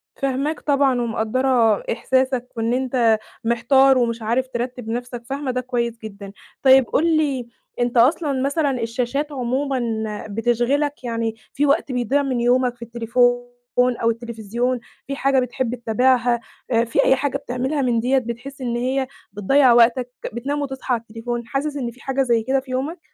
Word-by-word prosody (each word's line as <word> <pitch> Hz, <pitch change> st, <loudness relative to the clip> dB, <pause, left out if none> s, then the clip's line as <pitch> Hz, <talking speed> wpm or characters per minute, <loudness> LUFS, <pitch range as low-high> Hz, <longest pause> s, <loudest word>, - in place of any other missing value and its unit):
فاهماك 275 Hz, +3 st, -1 dB
طبعًا 275 Hz, -4 st, +2 dB
ومقدّرة 230 Hz, -1 st, +1 dB
إحساسك، 260 Hz, +1 st, 0 dB
وإن 230 Hz, +1 st, 0 dB
أنت 245 Hz, -4 st, +2 dB, 0.2 s
محتار 255 Hz, +4 st, +4 dB
ومش 235 Hz, -2 st, 0 dB
عارف 235 Hz, +4 st, 0 dB
ترتِّب 245 Hz, -2 st, -4 dB
نَفْسك، 245 Hz, 0 st, -4 dB
فاهمة 275 Hz, +1 st, -3 dB
ده 255 Hz, -, -1 dB
كويس 235 Hz, -2 st, -2 dB
جدًا. 200 Hz, -2 st, -8 dB, 0.3 s
طيب 265 Hz, -1 st, +7 dB
قُل 325 Hz, +1 st, +2 dB
لي 270 Hz, -6 st, 0 dB, 0.3 s
أنت 240 Hz, 0 st, 0 dB
أصلًا 275 Hz, +2 st, +3 dB
مثلًا 275 Hz, -2 st, 0 dB
الشاشات 250 Hz, +6 st, -2 dB
عمومًا 265 Hz, +1 st, -1 dB, 0.5 s
بتشغلك؟ 240 Hz, +6 st, 0 dB
يعني 230 Hz, -2 st, -2 dB, 0.2 s
في 290 Hz, +2 st, +1 dB
وقت 280 Hz, -1 st, +1 dB
بيضيع 255 Hz, +3 st, +1 dB
من 260 Hz, -3 st, -1 dB
يومك 245 Hz, 0 st, +2 dB
في 240 Hz, -, -34 dB
التليفون 240 Hz, +1 st, +1 dB, 0.4 s
أو 245 Hz, -2 st, +3 dB
التليفزيون، 235 Hz, +1 st, -2 dB, 0.3 s
في 275 Hz, -, -3 dB
حاجة 275 Hz, -1 st, +2 dB
بتحب 250 Hz, -1 st, -2 dB
تتابعها، 245 Hz, +1 st, +2 dB, 0.3 s
آآ 230 Hz, -1 st, +3 dB
في 230 Hz, -, +2 dB
أي 265 Hz, -, +5 dB
حاجة 275 Hz, 0 st, -1 dB
بتعملها 270 Hz, +2 st, -2 dB
من 240 Hz, -3 st, +1 dB
ديَّة 255 Hz, +4 st, +2 dB
بتحس 255 Hz, +3 st, -5 dB
إن 240 Hz, -2 st, -2 dB
هي 260 Hz, +2 st, 0 dB, 0.3 s
بتضيّع 245 Hz, +5 st, +4 dB
وقتك 240 Hz, +1 st, +4 dB, 0.2 s
بتنام 280 Hz, +5 st, -2 dB
وتصحى 265 Hz, -2 st, -3 dB
على 230 Hz, -, 0 dB
التليفون، 230 Hz, +1 st, -5 dB
حاسس 285 Hz, +3 st, -2 dB
إن 245 Hz, -4 st, -3 dB
في 250 Hz, -, -19 dB
حاجة 270 Hz, 0 st, -1 dB
زي 235 Hz, -4 st, +2 dB
كده 265 Hz, +3 st, +1 dB
في 265 Hz, -1 st, -10 dB
يومك؟ 280 Hz, +7 st, -2 dB
250 Hz, 160 wpm, -21 LUFS, 235-270 Hz, 0.5 s, طيب